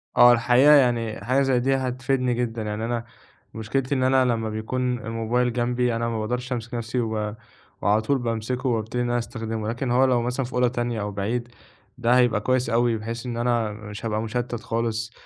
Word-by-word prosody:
آه، 120 - +8
الحقيقة 125 +4 +5
يعني 120 -6 +2
حاجة 130 +3 +2
زي 135 -2 +2
دي 135 +2 +2
هتفيدني 130 0 0
جدًا، 120 -1 -2
يعني 105 +1 -3
أنا 115 0 -2 0.5
مشكلتي 130 +5 -2
إن 130 - +1
أنا 130 0 +4
لمّا 115 -3 0
بيكون 125 +3 -2
الموبايل 115 +2 -1
جنبي 120 0 0
أنا 115 +1 -1
ما 115 - -2
باقدرش 125 +4 -2
أمسك 120 +1 -5
نَفْسي 120 +1 -2
و 110 -2 -2 0.5
وعلى 105 +3 +3
طول 140 +5 +1
بامسكه 120 +2 -2
وأبتدي 115 +1 -1
إن 120 - -2
أنا 120 - +1
أستخدمه، 115 -2 -4
لكن 120 +2 -2
هو 130 +2 +4
لو 125 -2 +2
مثلًا 125 +2 -1
في 125 - -10
أوضة 125 0 +3
تانية 120 -2 -2
أو 105 0 -3
بعيد، 110 +5 -2 0.5
ده 125 0 +3
هيبقى 120 -4 +3
كويس 130 +3 +1
أوي 115 0 +2
بحيث 115 +2 -6
إن 120 -1 -4
أنا 120 -2 +1
مش 105 +1 -8
هابقى 110 -1 -1
مُشتَّت 120 +1 -3
خالص 115 -1 -2
120 Hz, 195 wpm, -24 LUFS, 115-125 Hz, 0.5 s, آه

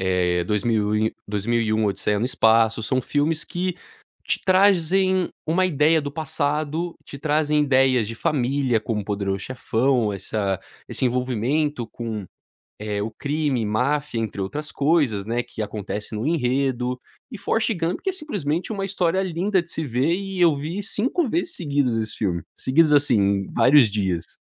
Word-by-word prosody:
eh, 90 -2 +1
dois 105 +2 0
mil 105 -3 +1
e 110 +1 +1 0.2
2001 110 +1 0
Odisseia 100 +1 0
no 115 - 0
Espaço, 115 -2 +3
são 130 +4 0
filmes 150 +4 0
que 180 0 -2 0.5
te - - 0
trazem 185 -1 +3 0.2
uma 180 +4 +2
ideia 155 -1 +3
do 145 -1 -5
passado, 155 +2 -2
te 140 - -9
trazem 150 +1 +1
ideias 130 -5 +3
de 115 - -5
família, 130 -2 0
como 110 -1 -2
O - - -13
Poderoso 100 -1 -2
chefão, 125 -2 0
essa 100 0 -2 0.3
esse - - -2
envolvimento 125 +2 0
com, 110 -4 -5 0.6
eh, 105 -1 -3
o 110 +2 -3
crime, 140 -2 -1
máfia 130 +5 0
entre 110 -2 -4
outras 145 +11 -4
coisas, 140 -10 +1
né, 120 +2 0
que 110 - -7
acontece 105 0 -5
no 110 +6 -2
enredo, 125 -4 0 0.3
e 230 - -6
Forest 225 +2 0
Gun 170 +1 -1
que 385 - -3
é - - -2
simplesmente 195 - -3
uma 195 -2 -2
história 190 -1 0
linda 185 +3 0
de 170 - -5
se 160 - -2
ver 130 +5 +1
e 195 0 -4
eu 165 -4 +5
vi 165 +8 -4
5 260 - 0
vezes 340 +7 0
seguidas 140 -7 0
esse 110 -1 -2
filme, 90 -5 -1 0.2
seguidas 150 +4 +3
assim, 100 -9 +3
vários 125 0 +6
dias. 95 -5 -2
135 Hz, 160 wpm, -23 LUFS, 110-160 Hz, 0.6 s, vários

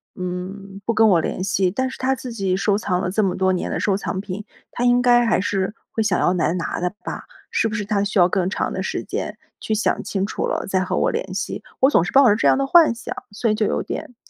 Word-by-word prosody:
嗯， 190 +2 -6
不 - - +1
跟 220 0 +4
我 180 -6 +4
联 185 - -3
系， 190 -1 +1
但 260 +8 -1
是 260 - -8
他 265 +1 +1
自 250 -1 -7
己 195 -4 0
收 200 +1 +2
藏 180 -4 -1
了 180 -1 -2
这 215 +3 +1
么 190 -2 0
多 190 0 +2
年 180 - -2
的 - - -2
收 200 - +1
藏 190 -1 -3
品， 200 +1 -5 0.3
他 240 - -3
应 245 0 +4
该 240 -1 +5
还 225 - +3
是， 195 +1 -1 0.2
会 225 - -1
想 205 -5 +1
要 180 - +2
来 170 -2 +1
拿 175 -2 -3
的 180 0 0
吧， - - -6 0.3
是 - - +1
不 215 - -4
是 210 -3 -2
他 200 -1 0
需 205 +1 -2
要 175 -2 +6
更 185 0 0
长 - - -2
的 - - -3
时 - - -3
间 - - -4 0.2
去 220 - -2
想 215 - 0
清 195 -1 -2
楚 - - -3
了， - - -2
再 190 -1 +1
和 185 - -2
我 - - +2
联 190 - -3
系。 190 +2 -4 0.2
我 265 +2 +6
总 165 - +4
是 180 - -4
抱 275 -1 +6
着 205 - +5
这 225 - +2
样 - - +5
的 275 - +1
幻 320 -4 +5
想， 230 - -6 0.2
所 215 +2 0
以 - - +2
就 215 0 +1
有 - - -1
点， 250 - -6
200 Hz, 295 characters per minute, -21 LUFS, 185-230 Hz, 0.3 s, 要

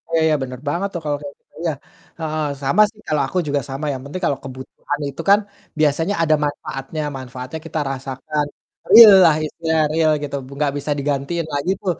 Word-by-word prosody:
Oh - - -9
ya - - +2
ya, 155 - +3
bener 130 -1 -5
banget 175 +6 -1
tuh 170 - -3
kalau 145 -1 0
kayak 145 -1 -8 0.3
iya, 170 -1 0 0.5
heeh, 155 -1 -2 0.2
sama 140 +9 +3
sih 215 - -23
kalau 150 -1 +1
aku 185 - -4
juga 145 -1 0
sama 135 +3 -4
yang 130 - -6
penting 165 +6 -6
kalau 140 -4 0
kebutuhan 130 +2 -6
itu 140 - -6
kan, 200 +1 +7 0.4
biasanya 155 +5 +2
ada 155 -1 +4
manfaatnya, 145 +1 -5 0.2
manfaatnya 130 +3 -7
kita 160 0 -3
rasakan. 135 +3 -3 0.4
Real 225 -3 +11
lah 160 -3 +5
istilahnya, 160 0 0
real 160 -1 +3
gitu, 140 -1 -4 0.3
gak 145 -2 +2
bisa 145 +1 -3
digantiin 145 +4 -2
lah 145 - 0
gitu 195 - -2
150 Hz, 190 wpm, -20 LUFS, 135-160 Hz, 0.5 s, Real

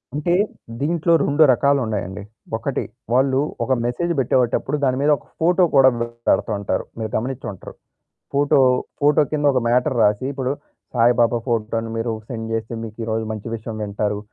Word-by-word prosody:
అంటే 160 +4 0 0.5
దీంట్లో 165 +3 +1
2 145 +2 +4
రకాలున్నాయండి. 110 -8 0 0.3
ఒకటి - - -2 0.3
వాళ్ళు 130 +1 +3 0.2
ఒక 130 - +1
మెసేజ్ 145 +9 -1
పెట్టేటప్పుడు 130 +3 +1
దాని 130 -1 +2
మీద 150 - +3
ఒక - - -20 0.2
ఫోటో 180 +2 +4
కూడా 135 -1 +7
పెడతా 115 -1 -1
ఉంటారు. 100 - -2
మీరు 110 -1 -3
గమనించ్చుంటరు. 120 -5 -5 0.6
ఫోటో, 145 0 +3 0.4
ఫోటో 150 +1 +4
కింద 145 -1 0
ఒక 130 - +3
మ్యాటర్ 125 +3 +2
రాసి, 105 +4 +2
ఇప్పుడు 130 -1 -2 0.4
సాయిబాబా 120 0 +3
ఫోటోను 115 -1 -1
మీరు 115 +1 -1 0.2
సెండ్ 115 -3 -5
చేస్తే 115 +1 -3
మీకు 110 -1 -8
ఈరోజు 110 0 -1
మంచి 110 +1 -6
విషయం 110 0 -7
వింటారు 105 0 -2
120 Hz, 145 wpm, -21 LUFS, 110-140 Hz, 0.6 s, కూడా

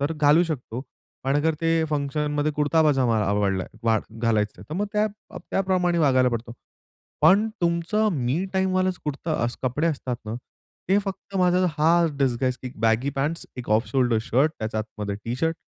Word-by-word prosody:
तर 145 +3 0
घालू 150 +2 +4
शकतो. 130 -6 -5 0.4
पण 135 +2 +2
अगर 160 +2 +2
ते 165 -1 +2
फंक्शनमध्ये 150 +1 -1
कुर्ता 150 +2 +2
पजामा 130 -7 +3
आवडला 100 -2 0 0.6
घालायचं 105 -3 +1
आहे. 95 - -10
तर - - -5
मग 205 +4 -1
त्या 210 +1 +2 0.4
त्याप्रमाणे 180 -3 +1
वागायला 130 -4 +4
पडतो. 115 0 -4 0.7
पण 210 +4 +6
तुमचं, 170 +5 +1
मी 140 +5 -1
टाईम 190 0 +1
वाला 185 0 +2
कुर्ता 150 +2 -3
असं 120 +2 -3
कपडे 145 +6 0
असतात 135 -6 -2
ना 110 +1 -4 0.5
ते 195 +2 +4
फक्त 195 0 -6
माझा 180 0 +3
हा 165 +2 +4
डिझाईन 130 -1 -1
बॅगी 115 +4 +2
पँट्स, 150 +5 -2
एक 125 - -7
ऑफ 110 +3 +3
शोल्डर 125 -4 +2
शर्ट, 135 +7 +2
त्याच्या 110 0 -3
आतमध्ये 105 -2 -5
टी 115 +1 -2
शर्ट, 165 +4 0
145 Hz, 165 wpm, -24 LUFS, 120-170 Hz, 0.7 s, पण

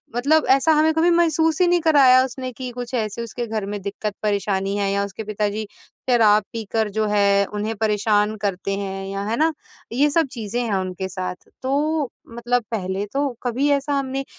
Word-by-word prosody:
मतलब 290 +5 +3
ऐसा 275 +4 +5
हमें 310 +1 +3
कभी 325 +2 +3
महसूस 325 -1 +2
ही 360 - +5
नहीं 350 0 +3
कराया 275 -5 +6
उसने 255 0 -5
कि 255 +1 -6
कुछ 245 0 -7
ऐसे 220 -2 -2
उसके 235 +1 -5
घर 215 -2 -3
में 205 0 -4
दिक्कत-परेशानी 200 -1 -2
है 200 -1 0
या 200 0 +1
उसके 200 +2 -7
पिताजी 210 0 -2 0.4
शराब 215 -3 +5
पीकर 220 -1 -2
जो 215 - +2
है 200 -1 +3
उन्हें 210 +2 -2
परेशान 210 0 +1
करते 195 -1 -2
हैं 195 -1 -4
या 195 0 -4
है 230 - 0
ना, 320 +2 +3 0.4
ये 280 +5 +3
सब 320 0 +2
चीज़ें 230 0 -3
हैं 225 -4 -1
उनके 185 0 -3
साथ, 180 0 -4 0.3
तो 290 +2 0 0.3
मतलब 240 +1 0
पहले 195 -2 -2
तो 280 +1 +1 0.2
कभी 255 +4 0
ऐसा 280 +1 -3
हमने 270 0 -3
225 Hz, 185 wpm, -22 LUFS, 205-270 Hz, 0.4 s, कराया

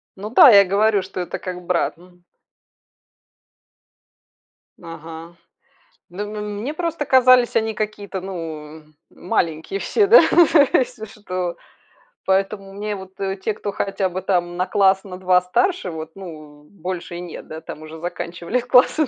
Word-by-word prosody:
Ну 205 +2 -7
да, 250 +3 +8
я 200 -3 +9
и - - +2
говорю, 205 +2 +2
что 190 0 -8
это 180 - -4
как 180 -1 -7
брат, 170 -3 0
м. 180 0 -20 2.6
Ага. 165 +1 -10 0.7
Ну, 190 +4 -5
м 210 -1 -5
мне 285 +6 -3
просто 330 -3 -3
казались 255 -2 +5
они 220 -1 +1
какие-то, 205 -3 -4
ну, 160 -4 -7 0.3
маленькие 165 +2 -2
все, 410 - +1
да, 465 - +9 0.5
если 230 -4 0
что. 185 -5 -5 0.7
Поэтому 195 +1 -1
мне 205 +1 -4
вот, 190 0 -12
э, 195 0 -2
те, 210 +3 -3
кто 205 - -5
хотя 195 -1 -1
бы 185 +1 -5 0.2
на 175 +1 -4
класс, 195 -1 +3
на 185 -2 -8
2 185 0 +3
старше 185 - 0
вот, 160 -1 -7
ну, 155 -6 -11
больше 175 0 -7
и 175 - -6
нет 175 -2 -9
да, 160 +1 -8
там 155 - -9
уже 155 +1 -10
заканчивались 175 +6 -4
классы. 255 +4 +4
190 Hz, 150 wpm, -21 LUFS, 175-210 Hz, 2.6 s, я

